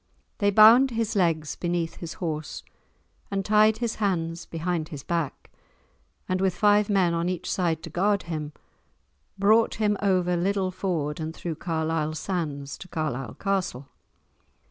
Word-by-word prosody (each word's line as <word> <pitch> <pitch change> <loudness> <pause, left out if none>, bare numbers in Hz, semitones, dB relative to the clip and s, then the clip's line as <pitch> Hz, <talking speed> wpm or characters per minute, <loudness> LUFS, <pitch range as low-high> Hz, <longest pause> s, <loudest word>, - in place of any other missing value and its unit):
They 205 - +3
bound 225 +6 +7
his 230 -3 -2
legs 165 -5 +1
beneath 175 -2 -2
his 170 -2 -6
horse, 155 -3 -4 0.7
and 195 -1 -2
tied 215 +1 +4
his 235 -1 -2
hands 170 -4 -1
behind 165 -1 -3
his 145 -5 -8
back, 165 -4 -3 0.8
and 185 0 -1
with 190 -2 +1
five 210 0 +3
men 185 -4 +3
on 170 +1 0
each 180 -1 -3
side 165 -4 0
to - - -8
guard 200 +3 +1
him, 155 -3 -5 0.9
brought 215 +3 +4
him 210 -1 +1
over 185 -3 +2
Liddel 190 +1 0
ford 160 -6 -2
and 160 +1 -4
through 165 -3 -5
Carlisle 160 -2 -1
sands 150 -6 -4
to 185 - -10
Carlisle 145 -7 -3
castle. 185 -10 -2
175 Hz, 145 wpm, -26 LUFS, 160-200 Hz, 0.9 s, bound